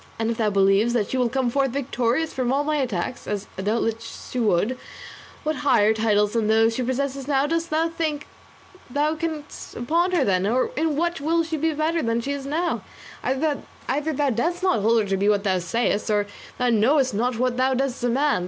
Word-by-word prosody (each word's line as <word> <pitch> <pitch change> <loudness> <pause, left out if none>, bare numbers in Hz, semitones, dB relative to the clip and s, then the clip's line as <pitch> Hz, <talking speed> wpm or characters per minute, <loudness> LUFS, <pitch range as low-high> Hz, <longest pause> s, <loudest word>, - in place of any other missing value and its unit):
And 225 0 0
if 230 - -4
thou 220 -3 +2
believest 200 +4 +3
that 210 -4 0
she 260 - 0
will 250 -2 +2
come 255 -1 0
forth 275 +1 +1
victorious 260 +2 -1
from 255 -2 -1
all 280 +2 +2
my 305 0 0
attacks 245 -3 -3
as 205 -1 -3
doubtless 225 +3 -3
she 250 - -2
would 215 +2 +2 0.7
what 310 -1 -1
higher 220 -7 +3
titles 210 -2 +2
than 225 -2 +1
those 225 +1 +4
she 255 - -2
possesses 270 +2 -2
now 275 -1 +2
dost 330 +2 -1
thou 320 +2 +1
think 315 -3 -3 0.6
thou 295 +4 +1
canst 315 -2 -4 0.3
bestow - - -6
upon 335 +9 +1
her 330 -6 +3
then, 190 -1 +1
or 250 +4 +1
in 310 -1 0
what 340 0 -1
will 330 +3 +2
she 325 0 -3
be 320 +1 0
better 310 +2 0
then 280 - -2
than 230 +1 +1
she 275 - -3
is 280 -1 -4
now? 330 +5 -1 0.4
Either 280 +3 0 0.5
thou 285 -2 +1
dost 340 - -1
not 240 - +2
hold 225 +1 +3
her - - -5
to 195 0 0
be 200 +2 +2
what 205 -1 +2
thou 190 -3 +1
sayest, 210 +4 -1
or 205 -1 +2 0.3
thou 250 0 +1
knowest 255 +4 +3
not 240 +3 0
what 250 0 0
thou 260 +1 +2
dost 265 -1 -1
demand. 260 +1 +2
255 Hz, 215 wpm, -24 LUFS, 225-295 Hz, 0.7 s, those